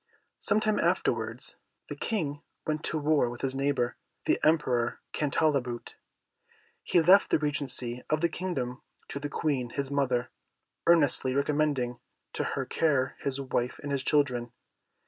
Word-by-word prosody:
Some 205 Hz, -, +2 dB
time 215 Hz, -1 st, +1 dB
afterwards, -, -, 0 dB, 0.3 s
the -, -, -5 dB
King 150 Hz, -10 st, -2 dB, 0.2 s
went 155 Hz, 0 st, -2 dB
to 160 Hz, -, 0 dB
war 150 Hz, -4 st, +2 dB
with 120 Hz, 0 st, -8 dB
his 135 Hz, 0 st, -1 dB
neighbour, 135 Hz, -3 st, 0 dB, 0.3 s
the -, -, +2 dB
Emperor 130 Hz, -7 st, +2 dB
Cantalabute. 140 Hz, -5 st, 0 dB, 0.9 s
He 175 Hz, -, +2 dB
left 185 Hz, +5 st, +6 dB
the -, -, +4 dB
regency 130 Hz, -5 st, +1 dB
of 155 Hz, 0 st, +1 dB
the 170 Hz, -, +4 dB
kingdom 140 Hz, -8 st, -3 dB, 0.3 s
to 140 Hz, -, -4 dB
the 145 Hz, 0 st, -4 dB
Queen, 135 Hz, -5 st, -1 dB
his 140 Hz, +3 st, -3 dB
mother, 130 Hz, -3 st, 0 dB, 0.6 s
earnestly 145 Hz, -6 st, +4 dB
recommending 140 Hz, -4 st, 0 dB, 0.3 s
to -, -, -1 dB
her -, -, -2 dB
care 140 Hz, -5 st, +1 dB
his 140 Hz, -1 st, -2 dB
wife 125 Hz, -2 st, -2 dB
and 145 Hz, -, -4 dB
his 140 Hz, -1 st, 0 dB
children. 125 Hz, -5 st, +1 dB
140 Hz, 145 wpm, -29 LUFS, 125-155 Hz, 0.9 s, left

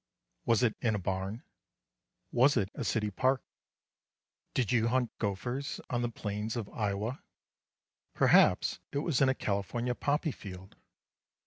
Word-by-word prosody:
Was 115 Hz, +1 st, +4 dB
it 115 Hz, -3 st, +2 dB
in 110 Hz, -3 st, +2 dB
a -, -, +1 dB
barn? 95 Hz, +4 st, -3 dB, 0.9 s
Was 130 Hz, +3 st, +4 dB
it 100 Hz, -2 st, 0 dB
a -, -, -4 dB
city 105 Hz, -2 st, 0 dB
park? 130 Hz, +5 st, +1 dB, 1.1 s
Did 125 Hz, -6 st, +1 dB
you 115 Hz, -2 st, +3 dB
hunt 125 Hz, 0 st, +1 dB
gophers 120 Hz, +7 st, -2 dB
on 120 Hz, -1 st, +1 dB
the 120 Hz, -, 0 dB
plains 105 Hz, 0 st, -4 dB
of 115 Hz, -4 st, -3 dB
Iowa? 105 Hz, +4 st, -2 dB, 0.9 s
Perhaps -, -, +5 dB
it -, -, -2 dB
was 150 Hz, -7 st, +1 dB
in 135 Hz, -, +6 dB
a 130 Hz, -, +2 dB
California 115 Hz, +4 st, -1 dB
poppy 145 Hz, +4 st, 0 dB
field. 95 Hz, -5 st, -10 dB
115 Hz, 140 wpm, -31 LUFS, 105-125 Hz, 1.1 s, in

